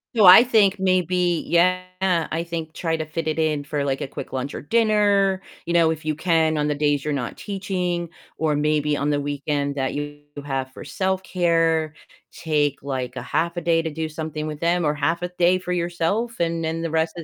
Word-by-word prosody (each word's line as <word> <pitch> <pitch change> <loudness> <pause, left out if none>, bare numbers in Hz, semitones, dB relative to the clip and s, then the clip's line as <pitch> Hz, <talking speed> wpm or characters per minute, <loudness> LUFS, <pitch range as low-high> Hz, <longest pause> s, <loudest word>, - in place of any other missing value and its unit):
So 215 -3 +5
I 185 +5 +10
think 210 -5 +3
maybe 180 -2 +1
Yeah, 185 +2 +3 0.5
I 165 +1 -1
think 165 -2 -5
try 165 -1 -1
to 155 - -3
fit 160 +1 -4
it 155 +1 -1
in 155 -2 0
for, 145 0 -2
like, 135 -1 -1
a - - -3
quick - - -8
lunch 130 +2 -3
or - - -6
dinner, 205 -1 +2 0.2
you 170 - -2
know, 165 -2 +4
if 155 -1 -4
you 155 - 0
can 160 0 +2
on 150 0 0
the 150 - 0
days 145 -1 +1
you're 150 -1 -1
not 125 -4 -4
teaching, 180 -4 -3 0.3
or 155 -2 +1
maybe 150 0 +1
on 145 +1 -1
the 145 - +1
weekend 145 0 -2
that 135 -2 -1
you 145 0 -5 0.3
have 135 -2 -3
for - - -10
self-care, 165 -2 0 0.4
take, 150 -4 -1
like, 130 -2 -4
a 130 - -4
half 170 +6 -1
a - - -1
day 165 0 +2
to 165 - -3
do 160 +1 -4
something 155 -1 -5
with 150 -1 -5
them 170 0 +1
or 150 - +2
half 160 +4 -1
a 180 - -2
day 180 +1 +4
for 180 -1 -6
yourself, 175 +7 -1
and 165 -1 0
then 165 +1 -2
the 165 - -3
rest 160 +1 0
of 170 - -5
160 Hz, 215 wpm, -23 LUFS, 150-175 Hz, 0.5 s, I